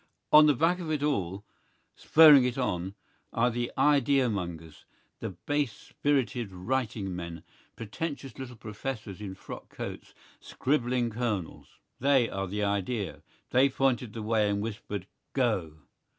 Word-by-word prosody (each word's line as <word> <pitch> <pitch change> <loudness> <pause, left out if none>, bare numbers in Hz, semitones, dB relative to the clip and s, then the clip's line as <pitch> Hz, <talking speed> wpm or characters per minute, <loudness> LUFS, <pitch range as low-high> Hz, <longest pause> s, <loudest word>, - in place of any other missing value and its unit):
On 150 0 +9
the 145 - +4
back 165 +7 +2
of 170 -3 -5
it 150 -2 -1
all, 100 - -1 0.5
spurring 150 -4 +7
it 125 0 -1
on, 95 -6 -2 0.4
are 120 +2 +2
the 120 +1 -2
idea 140 -4 +3
mongers, 85 -5 -6 0.4
the - - -4
base 140 +7 -2
spirited 125 -7 -1
writing 105 -1 -2
men, 85 -2 -6 0.3
pretentious 135 +5 -5
little 125 -2 -7
professors 105 -2 -6
in 95 -2 -6
frock - - -10
coats, - - -7 0.2
scribbling 125 -3 0
colonels. 110 -7 -4 0.2
They 135 -4 +4
are 95 -2 -3
the 105 +3 -2
idea. 100 +1 -2 0.3
They 130 +2 +5
pointed 125 -4 0
the 110 - -5
way 110 -1 +2
and 100 0 0
whispered 105 -3 -5 0.3
"Go!" 110 - 0
115 Hz, 135 wpm, -29 LUFS, 100-135 Hz, 0.5 s, On